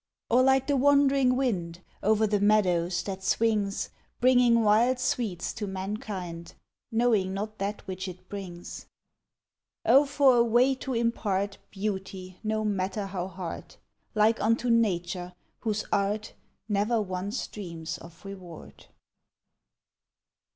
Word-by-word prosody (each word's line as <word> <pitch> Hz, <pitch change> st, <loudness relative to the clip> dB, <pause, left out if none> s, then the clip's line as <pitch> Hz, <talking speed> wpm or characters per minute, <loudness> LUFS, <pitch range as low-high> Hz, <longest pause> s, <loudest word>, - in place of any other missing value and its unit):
OR, 245 Hz, +2 st, +6 dB
LIKE 265 Hz, 0 st, +4 dB
THE 285 Hz, -, +1 dB
WANDERING 275 Hz, -1 st, +4 dB
WIND, 180 Hz, -10 st, -1 dB, 0.2 s
OVER 220 Hz, +1 st, +3 dB
THE 210 Hz, -1 st, +1 dB
MEADOWS 185 Hz, -4 st, +2 dB
THAT 190 Hz, -1 st, -5 dB
SWINGS, 210 Hz, -2 st, 0 dB, 0.3 s
BRINGING 245 Hz, -2 st, +5 dB
WILD 230 Hz, +5 st, +4 dB
SWEETS 230 Hz, -8 st, -2 dB
TO 210 Hz, -2 st, -4 dB
MANKIND, 190 Hz, -3 st, -5 dB, 0.4 s
KNOWING 225 Hz, -5 st, +2 dB
NOT 215 Hz, +2 st, -5 dB
THAT 200 Hz, +2 st, -3 dB
WHICH 185 Hz, 0 st, -4 dB
IT 185 Hz, 0 st, -10 dB
BRINGS. 180 Hz, -4 st, -8 dB, 1.0 s
OH, 280 Hz, +2 st, +6 dB
FOR 275 Hz, -3 st, +4 dB
A 235 Hz, -, +6 dB
WAY 240 Hz, +3 st, +4 dB
TO 260 Hz, -1 st, -4 dB
IMPART 205 Hz, -4 st, -1 dB
BEAUTY, 190 Hz, -2 st, -5 dB
NO 215 Hz, 0 st, -1 dB
MATTER 200 Hz, 0 st, -1 dB
HOW 185 Hz, -2 st, -4 dB
HARD! 180 Hz, -2 st, -7 dB, 0.4 s
LIKE 215 Hz, +2 st, +3 dB
UNTO 230 Hz, +2 st, +2 dB
NATURE, 180 Hz, -5 st, 0 dB, 0.3 s
WHOSE 215 Hz, -2 st, -2 dB
ART 205 Hz, +2 st, 0 dB, 0.3 s
NEVER 215 Hz, +2 st, +1 dB
ONCE 195 Hz, +2 st, -3 dB
DREAMS 165 Hz, -5 st, -6 dB
OF 170 Hz, +3 st, -14 dB
REWARD. 185 Hz, -4 st, -10 dB
205 Hz, 125 wpm, -28 LUFS, 185-230 Hz, 1.0 s, OR